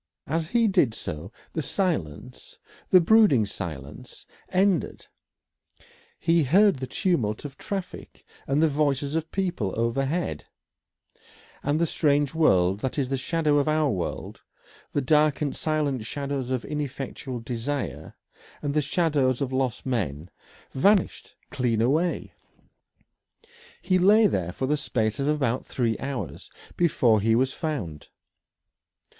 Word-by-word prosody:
As 165 0 -1
he 230 +4 +2
did 175 - +2
so, 80 +7 -6 0.2
the 160 - -1
silence 145 - -3 0.3
the 185 - +7
brooding 170 - +5
silence 75 -8 -8 0.2
ended; 185 -3 +1 1.1
he 165 0 +2
heard 190 +6 +4
the 130 0 -5
tumult 125 - -1
of 140 -2 -7
traffic 195 -3 -7 0.2
and 140 +3 +2
the - - +5
voices 145 -1 0
of 160 0 -2
people 175 - -2
overhead, 135 +9 -1 1.2
and 145 +2 0
that 170 - +3
strange 145 -2 +1
world 95 - +3
that 130 +5 -3
is 135 -3 0
the 135 - 0
shadow 150 +2 +1
of 140 - 0
our 155 -2 +2
world 90 -5 -4 0.5
the 145 - 0
dark 150 +2 +3
and 145 -3 -2
silent 150 -6 -1
shadows 140 +1 -4
of 130 -2 -2
ineffectual 135 -3 -5
desire 120 +4 -4 0.5
and 145 -1 -1
the 150 - +2
shadows 145 -4 +1
of 135 -2 -2
lost 130 -3 -1
men 90 - -2 0.4
vanished 195 +7 +1 0.2
clean 120 -4 0
away. 155 +9 0 1.5
He 185 -1 +2
lay 210 +4 +6
there 90 - 0
for 130 - -3
the 150 +3 +1
space 110 -5 -1
of 140 - 0
about 135 -5 0
three 115 -3 -1
hours 135 -2 -5 0.3
before 120 -10 +3
he 110 +2 +3
was 130 +3 +1
found. 105 - -4
140 Hz, 130 wpm, -26 LUFS, 120-160 Hz, 1.5 s, the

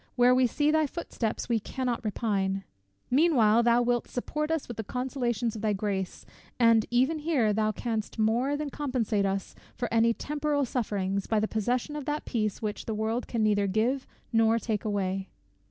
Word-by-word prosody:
Where 245 0 +5
we 255 0 +4
see 295 +5 +1
thy 310 -1 +3
footsteps 255 -8 -3
we 235 -2 +2
cannot 245 +3 -3
repine. 195 -3 -1 0.5
Meanwhile, 245 -7 +5
thou 235 +1 +4
wilt 240 0 0
support 300 +5 -3
us 320 -2 -1
with 240 - -7
the 220 - -3
consolations 245 -2 -2
of 215 - -6
thy 215 -1 +1
grace; 195 -2 -3 0.3
and 230 -2 +5
even 260 +6 +2
here 285 -9 +2
thou 215 0 +1
canst 220 0 -3
more 235 +6 +1
than 295 -1 -4
compensate 240 -8 0
to - - +2
us 195 0 -3 0.2
for 245 - -2
any 230 0 +4
temporal 295 -1 -1
sufferings, 200 -5 -2
by 220 - +2
the 215 - 0
possession 245 +7 -1
of 295 -2 -5
that 295 0 -2
peace, 215 -3 -2
which 210 -1 -3
the 220 - -2
world 220 +3 -1
can 230 -2 -1
neither 205 -1 +2
give 235 +7 0 0.3
nor 225 0 +4
take 220 -3 -2
away." 195 -2 -1
230 Hz, 185 wpm, -28 LUFS, 215-260 Hz, 0.5 s, Where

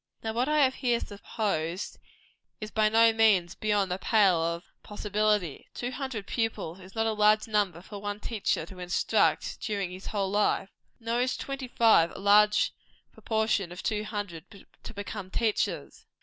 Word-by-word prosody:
Now 220 0 -2
what 245 +5 0
I 300 -1 +4
have 260 -1 +3
here 240 -3 0
supposed, 200 -4 -3 0.6
is 215 0 -6
by 215 -1 +3
no 225 +1 +5
means 205 -6 +3
beyond 205 -3 0
the 180 - -2
pale 195 -7 +3
of 170 +1 -2 0.2
possibility. 210 -5 -1
Two 245 +1 -3
hundred 255 -5 -5
pupils 210 -7 -3
is 190 +2 -14
not 225 0 +1
a 225 - +1
large 215 +1 +3
number 200 -5 0
for 205 +1 -9
one 205 0 -4
teacher 210 -7 -1
to 185 +2 -12
instruct 180 0 +1
during 200 -5 -2
his 185 +1 -9
whole 195 -2 -1
life. 205 -1 +1 0.3
Nor 230 +1 -1
is 255 +1 0
twenty 275 -1 -5
five 225 -8 +4
a - - -7
large 210 +1 +4 0.4
proportion 220 -5 0
of 180 - -8
two 210 -1 -1
hundred 205 -4 -7 0.2
to - - -9
become 205 -1 -6
teachers. 220 +2 -2
210 Hz, 165 wpm, -28 LUFS, 190-225 Hz, 0.6 s, no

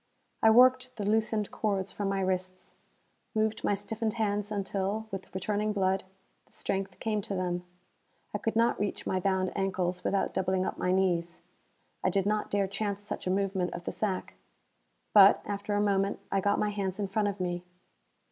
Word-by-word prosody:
I 220 - +7
worked 255 +2 +5
the 205 -3 -3
loosened 215 -1 +1
cords 195 -3 -1
from 200 -1 -2
my 195 0 0
wrists; 185 0 -2 0.6
moved 220 0 0
my 205 - +2
stiffened 215 +2 -3
hands 210 -2 -1
until, 200 +1 -2
with 190 -1 -6
returning 210 +2 0
blood, 190 -1 +1 0.4
the - - -30
strength 195 -1 -3
came 215 -2 0
to 195 - -4
them. 180 -1 -1 0.7
I - - -1
could 225 - -1
not 230 +1 +3
reach 205 0 -2
my 185 - 0
bound 190 0 0
ankles 185 -2 -1
without 200 - 0
doubling 185 0 +1
up - - -4
my 180 - +1
knees. 175 -3 +1 0.6
I - - +3
did 195 -2 +1
not 210 +1 0
dare 200 -1 +2
chance 200 +1 -3
such 205 - -5
a - - +1
movement 190 -1 0
of 175 0 -7
the - - -2
sack. 195 -4 -2 0.8
But, 200 -1 +8
after 205 0 -2
a - - +2
moment, 200 -1 +1
I 195 - +2
got 200 +1 +2
my 210 - +1
hands 195 -2 -2
in 205 -2 -1
front 205 +2 0
of 200 -1 -3
me. 175 -1 -2
200 Hz, 185 wpm, -30 LUFS, 190-210 Hz, 0.8 s, But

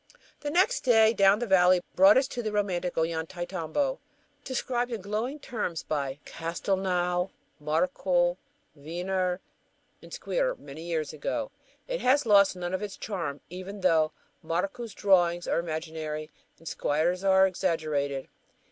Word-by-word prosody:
The 290 - -4
next 375 +11 +2
day 225 -3 +5
down 195 -1 +5
the 240 - -2
valley 185 -3 +5
brought 290 +1 +7
us 265 0 +3
to 235 -5 -3
romantic 185 -4 -1
Ollantaytambo, 170 - -2 0.4
described 245 -1 -2
in 230 - -3
glowing 215 +8 -3
terms 210 - -4
by 140 -3 -2
Castelnau, 180 +1 -1 0.3
Marcou, 175 - +1 0.4
Wiener, 180 +4 -2 0.6
and - - -14
Squier - - -1
many 150 +3 -10
years 165 -3 -3
ago. 265 - -3 0.4
It - - -3
has 270 +2 +3
lost 200 -3 +5
none 175 0 -4
of 185 - -1
its 205 -2 -5
charm, 170 -9 -4
even 190 +3 -7
though 160 -4 +3 0.3
Marcou's 195 +8 -3
drawings 175 -3 +3
are - - +1
imaginary 155 -2 -4 0.3
and 165 - -14
Squier's 170 +7 0
are 190 0 +6
exaggerated. 150 -6 -1
185 Hz, 130 wpm, -28 LUFS, 165-215 Hz, 0.6 s, brought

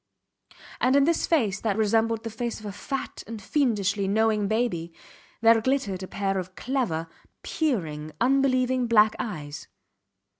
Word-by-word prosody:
And 255 +2 +3
in 280 - +5
this 330 +3 +1
face 220 -12 +1
that 215 -3 0
resembled 225 +1 +1
the 225 - -5
face 235 +1 -4
of 215 - -12
a 205 - -4
fat 270 +7 -5
and 225 0 -6
fiendishly 205 -5 0
knowing 215 0 +2
baby 215 -7 -1 0.5
there 230 0 +6
glittered 220 -7 -1
a 190 - -6
pair 195 -1 -1
of 185 0 -7
clever, 225 -12 -2 0.4
peering, 160 - -2
unbelieving 255 -1 +2
black 215 -2 +5
eyes. 155 - -6
220 Hz, 145 wpm, -26 LUFS, 195-255 Hz, 0.5 s, there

